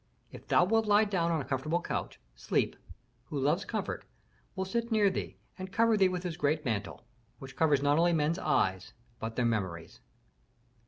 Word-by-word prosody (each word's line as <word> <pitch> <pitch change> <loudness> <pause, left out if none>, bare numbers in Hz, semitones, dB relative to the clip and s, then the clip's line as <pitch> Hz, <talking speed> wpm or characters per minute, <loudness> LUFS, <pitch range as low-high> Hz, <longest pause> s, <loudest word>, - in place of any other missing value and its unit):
If - - -12
thou 175 - +4
wilt 225 +3 +2
lie 210 +1 +5
down 180 -5 0
on 160 -3 0
a - - -7
comfortable 145 +6 -1
couch, - - -4 0.2
Sleep, - - 0 0.5
who 150 - -5
loves 150 +8 +1
comfort, 215 -3 -3 0.5
will 190 -1 -2
sit 235 +4 -2
near 210 -3 +4
thee - - -5 0.2
and 185 0 -6
cover 230 +1 +3
thee 190 -3 +4
with 180 -1 -3
his 170 -3 -4
great 150 +2 0
mantle, 110 -1 -3 0.3
which 135 0 -11
covers 145 -4 +2
not 145 +2 +3
only 175 +1 +4
men's 160 +3 +1
eyes, 95 0 0 0.3
but 115 0 -5
their 125 - +1
memories." 95 -8 -2
165 Hz, 180 wpm, -30 LUFS, 135-190 Hz, 0.5 s, lie